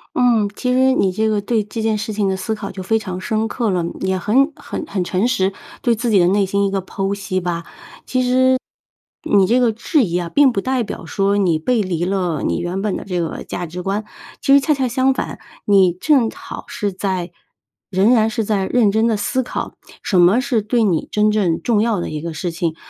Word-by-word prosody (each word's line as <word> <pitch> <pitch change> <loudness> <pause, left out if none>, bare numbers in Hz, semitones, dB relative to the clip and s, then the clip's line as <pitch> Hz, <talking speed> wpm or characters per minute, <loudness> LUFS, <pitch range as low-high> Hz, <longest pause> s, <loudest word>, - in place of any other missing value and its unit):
嗯， 235 -5 +3
其 250 0 -1
实 260 +1 +4
你 190 -7 +1
这 220 +3 0
个 210 -1 +1
对 220 +1 0
这 210 +2 -6
件 220 -1 +1
事 215 +1 -4
情 205 -2 0
的 190 - 0
思 220 +4 -3
考 200 -2 -6
就 190 - -7
非 225 +4 +1
常 185 -3 -6
深 220 +2 -1
刻 230 -2 -1
了， 180 -2 0
嗯， 170 - -5
也 190 0 0
很 270 - +2
很 - - -6
很 185 -8 -2
诚 190 +7 0
实， 190 -6 +1 0.3
对 240 -3 +3
自 235 +1 -2
己 200 - +4
的 175 - +4
内 200 +1 +2
心 200 +1 0
一 - - -1
个 195 -1 -1
剖 195 +1 -3
析 195 -2 -3
吧。 170 -1 -3 1.6
其 - - -7
实， - - +3
你 190 -1 +5
这 245 +3 +3
个 235 -2 +3
质 245 +5 +1
疑 175 -2 -1
啊， 175 -1 -2
并 285 +2 +4
不 200 - -1
代 260 -2 0
表 180 - -7
说 200 +4 0
你 175 -5 +2
背 230 +6 +1
离 175 -3 -2
了 180 -4 -1
你 - - 0
原 180 +3 -3
本 210 -2 -1
的 - - -8
这 180 -3 -2
个 165 - -4
价 175 - -4
值 175 +3 -7
观。 195 +3 -2 0.4
其 275 - +3
实 280 - +8
恰 300 +2 +1
恰 265 -2 -1
相 260 +2 +2
反， - - -5 0.3
你 190 -4 +4
正 245 - +2
好 - - -9
是 205 -4 -3
在 185 -2 -3 0.6
仍 200 +5 +3
然 220 -2 +3
是 225 -1 -2
在 200 -3 0
认 225 -5 +3
真 220 +2 +2
地 225 - +2
思 260 +5 0
考， - - -5 0.3
什 185 - +2
么 190 +8 +5
是 245 -5 0
对 225 +2 +1
你 175 -6 0
真 210 0 +3
正 185 -6 +1
重 220 -3 +2
要 225 -5 +1
的 - - -4
一 155 - -4
个 165 -1 -5
事 170 +3 -3
情。 165 -1 -2
205 Hz, 255 characters per minute, -19 LUFS, 185-230 Hz, 1.6 s, 实